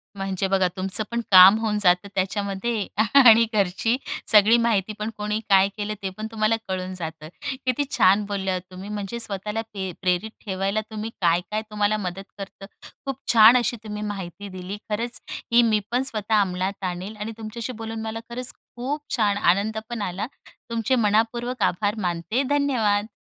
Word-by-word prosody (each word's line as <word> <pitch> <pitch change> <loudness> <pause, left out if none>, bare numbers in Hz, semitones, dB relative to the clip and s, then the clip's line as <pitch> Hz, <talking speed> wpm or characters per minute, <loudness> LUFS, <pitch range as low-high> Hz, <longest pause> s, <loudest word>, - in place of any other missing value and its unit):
म्हणजे 195 -1 -2
बघा, 190 -1 +2
तुमचं 190 +3 0
पण 235 0 -1
काम 190 +2 +10
होऊन 215 -2 0
जातं 180 +1 +3
त्याच्यामध्ये 200 +3 -1 0.4
आणि 230 0 +8
घरची 205 +3 +1 0.4
सगळी 215 +2 +7
माहिती 220 -3 +1
पण 215 +1 -2
कोणी 210 +1 -2
काय 195 -1 +6
केलं 210 0 -3
ते 190 - -1
पण 215 0 -4
तुम्हाला 220 0 +1
कळून 185 0 -3
जातं. 160 -3 -7 0.4
किती 255 +3 +1
छान 195 +3 +5
बोलल्या 195 -2 -2
ओ - - -2
तुम्ही! 185 +2 -9
म्हणजे 210 +2 -4
स्वतःला 210 0 -3
पि 190 -2 -4
प्रेरित 180 +4 0
ठेवायला, 195 +1 -1
तुम्ही 215 +1 -4
काय-काय 180 +5 +1
तुम्हाला 210 0 +1
मदत 190 -1 -5
करतं, 195 0 -9 0.4
खूप 270 -2 -3 0.2
छान 225 +2 +8
अशी 245 0 0
तुम्ही 210 -1 -6
माहिती 205 -1 -6
दिली. 185 +2 -7
खरंच 235 +3 -2 0.3
ही 235 +1 +6
मी 220 -2 +3
पण 250 +2 +1
स्वतः 215 -4 +1
अमलात 190 +1 -2
आणील 185 +4 -4
आणि 210 +2 -4
तुमच्याशी 225 +3 -6
बोलून 225 0 -6
मला 220 0 -4
खरंच 245 +1 -4 0.2
खूप 270 +5 -3
छान 210 -4 +2
आनंद 205 +4 +2
पण 235 -2 -4
आला. 195 +2 -3 0.4
तुमचे 230 +2 0
मनःपूर्वक 230 +2 0
आभार 205 +4 +1
मानते. 175 +9 -1
धन्यवाद. 235 -8 +1
210 Hz, 165 wpm, -24 LUFS, 190-225 Hz, 0.4 s, काम